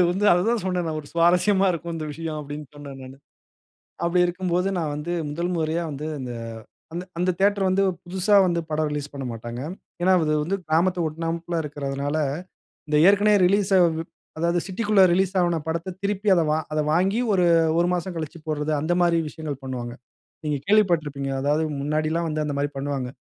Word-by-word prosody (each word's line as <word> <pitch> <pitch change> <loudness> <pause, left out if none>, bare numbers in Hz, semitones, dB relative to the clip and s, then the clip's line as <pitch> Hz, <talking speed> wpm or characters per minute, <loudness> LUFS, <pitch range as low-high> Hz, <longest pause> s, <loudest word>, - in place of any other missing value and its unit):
அது 180 - +6
வந்து 195 +3 -1
அதுதான் 215 +5 +2
சொன்னேன் 180 -2 -1
நான். 155 -1 -2
ஒரு 145 - -15
சுவாரஸ்யமா 180 +4 +3
இருக்கும் 170 0 -5
இந்த 155 -1 -4
விஷயம் 160 0 -5
அப்டின்னு 145 0 -7
சொன்னேன் 140 -2 -9
நானு. 130 +1 -10 0.9
அப்டி 175 +1 +2
இருக்கும்போது 180 +1 -1
நான் 155 -3 -1
வந்து, 150 +4 -4 0.2
முதல் 170 +4 -2
முறையா 160 +1 0
வந்து 145 +2 -5
இந்த 125 -1 -5 0.9
அந்த 180 +1 +2
தியேட்டர் 200 0 +3
வந்து 195 +1 +2 0.2
புதிசா 190 +3 +1
வந்து 170 -1 +1
படம் 155 0 0
ரிலீஸ் 145 0 -4
பண்ணமாட்டாங்க. 120 -3 -6 0.4
ஏன்னா, 185 +1 +4
அது 155 0 +1
வந்து 185 +6 -1
கிராமத்த 175 +3 +2
ஒட்டுநாபிள 165 +2 -3
இருக்கிறதனால 140 0 -3 0.7
இந்த 150 0 +2
ஏற்கனவே 205 +1 +5
ரிலீஸ் 200 +1 +2
அ - - +6 0.6
அதாவது 170 +1 +1
சிட்டிக்குள்ள 205 +1 +2
ரிலீஸ் 190 +2 +2
ஆன 170 -2 +1
படத்த 170 +3 -3
திருப்பி 200 +1 -2
அத 170 - +3 0.3
அத 155 - 0
வாங்கி 190 +7 +2
ஒரு 180 -2 +3 0.3
ஒரு 175 - +3
மாசம் 180 +1 -2
கழிச்சு 160 +1 -5
போட்றது 155 0 -2
அந்த 165 +3 +1
மாதிரி 170 -1 +3
விஷயங்கள் 145 -4 -6
பண்ணுவாங்க. 125 -2 -5 0.5
நீங்க 150 -1 0
கேள்விப்பட்டிருப்பீங்க. 160 -10 +2
அதாவது 150 +3 +1 0.2
முன்னாடி 155 +2 0
எல்லாம் 170 0 0
வந்து 155 0 -1
அந்த 145 -1 -3
மாரி 145 0 0
பண்ணுவாங்க. 135 -2 -3
165 Hz, 170 wpm, -24 LUFS, 150-180 Hz, 0.9 s, அது